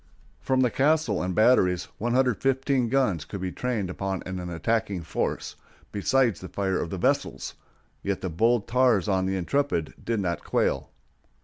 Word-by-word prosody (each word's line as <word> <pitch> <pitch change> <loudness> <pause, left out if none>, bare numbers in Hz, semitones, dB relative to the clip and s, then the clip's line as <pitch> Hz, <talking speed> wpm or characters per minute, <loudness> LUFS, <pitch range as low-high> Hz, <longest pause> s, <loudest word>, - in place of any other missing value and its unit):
From 130 -1 +1
the 125 -2 +3
castle 140 - +2
and 90 0 -2
batteries 90 -6 +4 0.2
115 130 +2 +1
guns 115 - +1
could 100 +5 -7
be 90 0 -3
trained 120 -5 -2
upon 95 +1 -3
an 95 -1 -4
attacking 95 +1 -1
force, - - -3 0.4
besides 115 0 +2
the 95 - -7
fire 95 -2 -1
of 85 - -3
the 95 - -4
vessels, - - 0 0.5
yet 100 -1 -2
the 95 - -2
bold 115 +6 +2
tars 120 -6 +3
on 95 -2 +1
the 95 0 0
Intrepid 95 - 0
did 115 -2 -1
not 85 -4 -2
quail. - - 0
100 Hz, 155 wpm, -26 LUFS, 95-125 Hz, 0.5 s, batteries